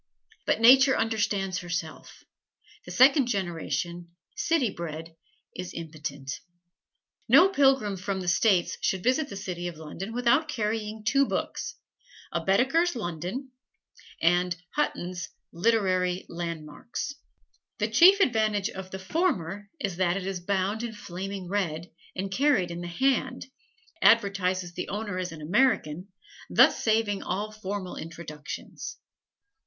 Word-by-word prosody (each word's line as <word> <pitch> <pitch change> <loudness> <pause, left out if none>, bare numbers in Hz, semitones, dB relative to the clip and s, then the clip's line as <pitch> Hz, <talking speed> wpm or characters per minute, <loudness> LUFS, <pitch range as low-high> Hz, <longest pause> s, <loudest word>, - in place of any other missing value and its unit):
But - - +2
Nature 265 +3 +7
understands 205 -4 0
herself: 175 -3 -6 0.6
the - - -8
second 270 +1 +6
generation, 175 -4 -3 0.3
city 330 - +1
bred, 165 -1 -7 0.4
is 180 0 -6
impotent. 145 -4 -6 0.9
No 320 +11 +8
pilgrim 270 - +3
from 190 +1 -3
"the 180 - -5
States" 180 0 +2
should 185 -2 0
visit 270 +4 +2
the - - -7
city 180 -3 -4
of 170 -3 -7
London 160 +6 -7
without 245 +6 +2
carrying 215 -4 -3
two 275 +4 +3
books: - - -3 0.6
a - - -2
Baedeker's 270 - +3
"London" 190 - -4 0.7
and 175 +1 +2
Hutton's 180 -11 -2 0.2
"Literary 185 -2 +1
Landmarks." 170 - -5 0.6
The - - 0
chief 380 +4 +7
advantage 215 - +2
of 190 0 -8
the 190 - -6
former 200 - -1
is 190 -4 -2
that 180 0 +2
it 190 - -4
is 195 -1 -3
bound 195 +4 -1
in 235 -1 -4
flaming 195 -1 -6
red, 175 -4 -2 0.2
and 195 +1 -3
carried 215 -7 +2
in 170 0 -5
the 175 - -5
hand, 260 +6 0 0.6
advertises 185 -5 +3
the 180 - -5
owner 205 -2 -3
as 185 0 -3
an 160 -2 -9
American, 185 - +1 0.4
thus - - +5
saving 215 -3 +1
all 205 +4 -3
formal 200 -3 -5
introductions. 160 - -7
195 Hz, 125 wpm, -27 LUFS, 175-230 Hz, 0.9 s, No